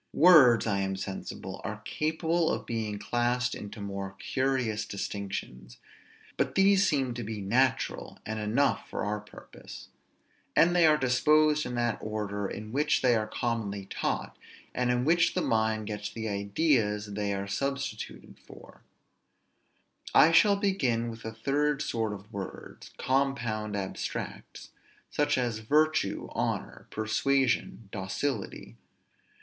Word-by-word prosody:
Words, 140 Hz, -8 st, +7 dB
I 100 Hz, -3 st, 0 dB
am 95 Hz, 0 st, -1 dB
sensible, 95 Hz, 0 st, -6 dB
are -, -, -5 dB
capable 160 Hz, +2 st, 0 dB
of -, -, -3 dB
being 110 Hz, -3 st, -3 dB
classed 120 Hz, +3 st, 0 dB
into 105 Hz, +2 st, -8 dB
more 100 Hz, -1 st, -5 dB
curious 130 Hz, -5 st, -1 dB
distinctions; 95 Hz, -12 st, -5 dB, 0.6 s
but -, -, 0 dB
these 195 Hz, 0 st, +5 dB
seem 135 Hz, -4 st, 0 dB
to 120 Hz, 0 st, -5 dB
be 110 Hz, 0 st, -5 dB
natural, 120 Hz, +7 st, 0 dB
and 110 Hz, 0 st, -3 dB
enough 115 Hz, +7 st, +1 dB
for -, -, -3 dB
our 105 Hz, +1 st, -1 dB
purpose; 105 Hz, -, -12 dB, 0.7 s
and 175 Hz, +2 st, +5 dB
they 170 Hz, -2 st, +6 dB
are 155 Hz, -1 st, +5 dB
disposed 150 Hz, +3 st, +3 dB
in 125 Hz, -, -4 dB
that 120 Hz, -2 st, 0 dB
order 105 Hz, -2 st, -3 dB
in 110 Hz, +2 st, -7 dB
which 145 Hz, +3 st, +1 dB
they 125 Hz, -2 st, +5 dB
are 110 Hz, -1 st, 0 dB
commonly 105 Hz, -4 st, -2 dB
taught, -, -, -2 dB, 0.4 s
and 125 Hz, 0 st, 0 dB
in 125 Hz, 0 st, +1 dB
which 170 Hz, +3 st, +3 dB
the -, -, +1 dB
mind 110 Hz, -1 st, +1 dB
gets 105 Hz, -1 st, -4 dB
the 110 Hz, -1 st, -5 dB
ideas 105 Hz, +1 st, +1 dB
they 100 Hz, 0 st, -1 dB
are 100 Hz, 0 st, -2 dB
substituted 140 Hz, +3 st, -4 dB
for. -, -, -15 dB, 1.3 s
I 160 Hz, -, +8 dB
shall 200 Hz, +5 st, +6 dB
begin 130 Hz, -, 0 dB
with 115 Hz, 0 st, -10 dB
the 115 Hz, -, -5 dB
third 140 Hz, +6 st, 0 dB
sort 115 Hz, -6 st, -1 dB
of 105 Hz, 0 st, -11 dB
words; 100 Hz, -1 st, -8 dB
compound 120 Hz, -6 st, 0 dB
abstracts, 95 Hz, -2 st, -5 dB, 0.4 s
such 145 Hz, -1 st, +1 dB
as 120 Hz, -3 st, -1 dB
virtue, 155 Hz, +8 st, +1 dB
honor, -, -, -3 dB
persuasion, 120 Hz, +1 st, 0 dB
docility. 105 Hz, +5 st, -4 dB
115 Hz, 135 wpm, -29 LUFS, 105-140 Hz, 1.3 s, I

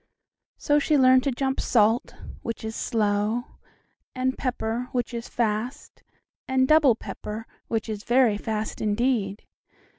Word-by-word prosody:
So 290 Hz, 0 st, +2 dB
she 295 Hz, +1 st, +2 dB
learned 260 Hz, -1 st, +6 dB
to 275 Hz, -, +2 dB
jump 265 Hz, +1 st, -1 dB
"salt," 225 Hz, +2 st, +2 dB, 0.3 s
which 230 Hz, -1 st, -5 dB
is 220 Hz, 0 st, -4 dB
slow, 210 Hz, +1 st, 0 dB, 0.7 s
and 260 Hz, 0 st, 0 dB
"pepper," 245 Hz, -2 st, -2 dB
which 245 Hz, -1 st, -2 dB
is 235 Hz, 0 st, -5 dB
fast, 235 Hz, +5 st, -3 dB, 0.5 s
and 260 Hz, 0 st, +2 dB
"double 305 Hz, -5 st, +5 dB
pepper," 220 Hz, 0 st, -7 dB, 0.2 s
which 225 Hz, 0 st, -2 dB
is 215 Hz, -2 st, -5 dB
very 240 Hz, -4 st, +3 dB
fast 220 Hz, -1 st, -3 dB
indeed. 215 Hz, -2 st, 0 dB
235 Hz, 130 wpm, -25 LUFS, 220-260 Hz, 0.7 s, learned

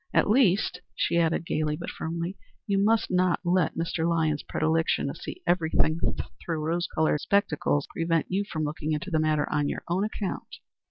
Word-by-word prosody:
At -, -, +4 dB
least," 210 Hz, -5 st, +3 dB
she 170 Hz, -, +1 dB
added, 165 Hz, 0 st, +1 dB
gayly 155 Hz, -2 st, 0 dB
but -, -, -5 dB
firmly, 170 Hz, +3 st, -4 dB, 0.3 s
"you 200 Hz, -1 st, +1 dB
must 225 Hz, +1 st, +2 dB
not 180 Hz, -1 st, +2 dB
let 175 Hz, -2 st, +1 dB
Mr. 165 Hz, 0 st, 0 dB
Lyons's 160 Hz, -3 st, +1 dB
predilection 160 Hz, +1 st, +1 dB
to -, -, -4 dB
see 365 Hz, -, -8 dB
everything 160 Hz, -2 st, +2 dB, 0.4 s
through 165 Hz, -2 st, -2 dB
rose 170 Hz, +2 st, 0 dB
colored 155 Hz, -2 st, +1 dB
spectacles 160 Hz, -7 st, +1 dB
prevent 165 Hz, -1 st, 0 dB
you 195 Hz, +2 st, 0 dB
from 155 Hz, -1 st, -2 dB
looking 155 Hz, +1 st, -2 dB
into 180 Hz, +5 st, -3 dB
the 160 Hz, -, +2 dB
matter 155 Hz, -1 st, +1 dB
on 145 Hz, -1 st, +1 dB
your -, -, -4 dB
own 180 Hz, +3 st, +1 dB
account." 210 Hz, -2 st, -4 dB
165 Hz, 175 wpm, -27 LUFS, 155-185 Hz, 0.4 s, At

